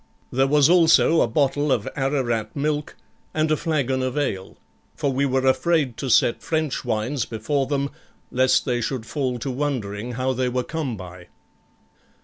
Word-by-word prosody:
There 135 +2 +2
was 145 0 +5
also 165 -1 +5
a - - +3
bottle 145 +3 +1
of 110 -5 0
Ararat 130 -6 -1
milk, 150 +1 -2 0.4
and 155 0 +1
a - - +4
flagon 140 -5 -1
of 130 +2 -2
ale, 95 -10 -3 0.4
for 140 - -1
we 140 +2 +1
were 130 0 0
afraid 130 0 +2
to 135 - -4
set 120 - +3
French 155 -3 -1
wines 120 +3 -1
before 130 +5 -2
them, 140 -1 -1 0.4
lest 130 +1 +3
they 120 -3 0
should 115 0 -3
fall 130 -2 -2
to 130 +3 -4
wondering 125 -5 -3
how 130 +2 -1
they 130 0 0
were 125 0 -1
come 140 -6 -4
by. 90 -1 -10
130 Hz, 165 wpm, -23 LUFS, 120-145 Hz, 0.4 s, was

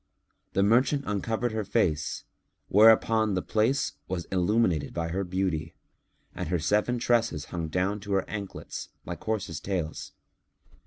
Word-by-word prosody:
The 95 - +3
merchant 130 +7 +3
uncovered 110 +3 -1
her 110 -1 -2
face, 90 -8 0 0.5
whereupon 110 0 +5
the 90 - -1
place 110 -2 +1
was 90 -2 -3
illumined 90 -5 +1
by 85 -1 -1
her 95 +4 -1
beauty 90 -4 -2 0.6
and - - -4
her 90 - +2
seven 105 +9 +1
tresses 115 -10 +1
hung 85 -2 -2
down 90 +5 0
to 100 0 -4
her 95 -1 +1
anklets 100 -3 -6 0.2
like - - -6
horses' 100 -8 -2
tails. 90 -5 -4
100 Hz, 140 wpm, -28 LUFS, 85-110 Hz, 0.6 s, whereupon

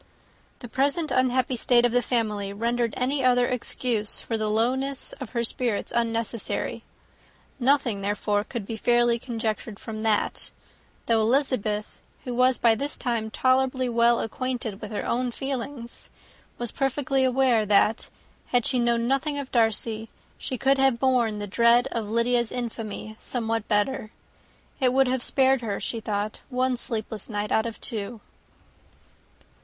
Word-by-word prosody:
The 245 - -6
present 285 +7 0
unhappy 255 0 +2
state 240 0 +4
of 240 - +2
the 245 +1 +3
family 210 -5 -1
rendered 235 +2 -1
any 265 +2 0
other 245 -1 +4
excuse 240 -3 -1
for 230 - -3
the 215 -1 -1
lowness 260 +5 0
of 260 - -5
her 235 -1 0
spirits 235 -2 -1
unnecessary; 230 -1 -2 0.8
nothing, 255 -5 +2
therefore, 205 +1 0
could 230 -2 -6
be 225 +2 -5
fairly 240 +1 +3
conjectured 225 -3 -3
from 215 -1 -6
that, 220 -2 0 0.6
though 225 -1 +3
Elizabeth, 220 -4 0 0.2
who 250 - -4
was 255 +1 +3
by 230 -1 +4
this 280 +6 -2
time 230 -3 -2
tolerably 255 +2 +1
well 235 0 +3
acquainted 240 -3 -4
with 210 - -6
her 210 - -4
own 250 +1 0
feelings, 250 -1 -5 0.5
was 240 -2 -3
perfectly 270 0 0
aware 255 -3 +3
that, 210 +2 +2 0.4
had 245 -2 +1
she 255 - +1
known 235 -1 +1
nothing 275 +3 0
of 280 -2 -5
Darcy, 225 -1 0 0.3
she 260 - -4
could 270 +2 +3
have 270 -3 +4
borne 240 -4 +2
the 205 - -4
dread 235 +4 +4
of 225 -3 -3
Lydia's 235 +1 +1
infamy 220 -2 -5
somewhat 225 -3 -2
better. 215 +2 0 0.7
It 255 -2 +3
would 270 0 +4
have 255 0 0
spared 265 0 +3
her, 205 -4 -3
she 230 - -3
thought, 210 -1 -3
one 255 0 +1
sleepless 220 -3 -4
night 205 -1 -3
out 220 +1 +2
of 230 - -7
two. 220 +1 -5
235 Hz, 150 wpm, -25 LUFS, 220-255 Hz, 0.8 s, state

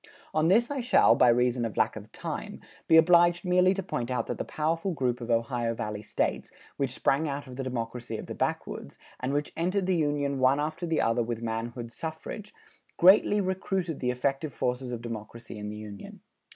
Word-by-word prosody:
On 155 +1 +2
this 230 +8 +4
I 285 - -2
shall, 245 - +5
by 125 - +5
reason 125 0 +2
of 115 -3 -4
lack - - +2
of - - -10
time, - - -6 0.3
be 160 - +7
obliged 175 +1 +5
merely 180 +1 +4
to 195 - -3
point 120 -7 -3
out 125 - -1
that - - -4
the - - 0
powerful 165 +4 -1
group 125 -4 -1
of 120 - -6
Ohio 115 0 0
Valley 105 -1 -4
States, - - -2 0.3
which 135 -2 0
sprang 140 +4 +1
out 140 +1 -4
of 130 -2 -10
the 135 - -4
democracy 120 -1 -4
of - - -7
the - - -6
backwoods, - - -3 0.2
and 130 +1 -2
which 145 +1 -2
entered 185 +3 0
the 185 0 +2
Union 145 -3 0
one 130 +2 +4
after 155 +4 -2
the 160 -1 +1
other 115 +1 +2
with 115 0 -3
manhood 115 +1 -4
suffrage, 160 - -7 0.5
greatly 195 +3 +6
recruited 190 -3 -2
the 125 - -1
effective 135 +3 -1
forces 125 0 -2
of 120 -1 -5
democracy 115 -1 -7
in 105 0 -5
the 105 - -6
Union. 105 -2 -9
135 Hz, 200 wpm, -28 LUFS, 120-170 Hz, 0.5 s, be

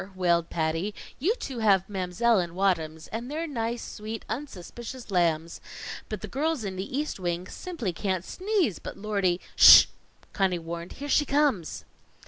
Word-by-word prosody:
wailed 170 -2 +2
Patty. 165 +5 -1 0.2
"You 375 - +2
two 265 - -6
have 195 -4 +3
Mam'selle 195 +3 +1
and 170 -2 -3
Waddams, 165 -4 0
and 230 +4 -4
they're 315 +3 -2
nice, 235 -5 -3
sweet, 220 +1 -7
unsuspicious 240 -1 -7
lambs; 170 -2 +1 0.5
but 215 -3 -4
the 215 - -5
girls 290 +3 -1
in 195 -2 -4
the 195 +8 -4
East 300 -7 -2
Wing 175 0 -2
simply 320 - -4
can't 185 0 -2
sneeze 375 - 0
but - - -8
Lordy 200 -4 0
" - - -28
"Sh!" - - +11 0.5
Conny 190 -2 +1
warned. 170 +1 -6
"Here 285 - -7
she 295 - +4
comes." 275 - +1
200 Hz, 160 wpm, -27 LUFS, 175-250 Hz, 0.5 s, Sh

